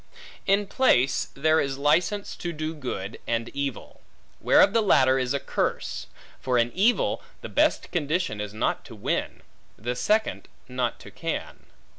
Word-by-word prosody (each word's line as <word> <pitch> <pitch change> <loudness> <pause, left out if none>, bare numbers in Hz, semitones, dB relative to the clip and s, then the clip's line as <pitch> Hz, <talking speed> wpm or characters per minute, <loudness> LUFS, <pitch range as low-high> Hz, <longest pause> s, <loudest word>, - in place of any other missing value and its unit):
In 200 +1 +3
place, 135 - +2
there 155 +3 +3
is 135 -1 -1
license 170 +8 +1
to 175 - -4
do 155 0 -4
good, 125 -9 -5
and 115 0 -1
evil; 140 -3 -5 0.4
whereof 200 - +5
the 230 - +4
latter 130 -10 +4
is 125 -1 -1
a 140 - +1
curse: - - -2 0.3
for 125 -1 0
in 120 0 +2
evil, 215 +6 +2 0.2
the - - -7
best - - +1
condition 155 - -1
is 105 -1 -5
not 110 +2 -1
to 120 - -11
win; 100 - -2 0.3
the 120 +4 -3
second, 210 - 0 0.2
not 125 -1 -2
to - - -12
can. - - -5
140 Hz, 155 wpm, -26 LUFS, 125-175 Hz, 0.4 s, whereof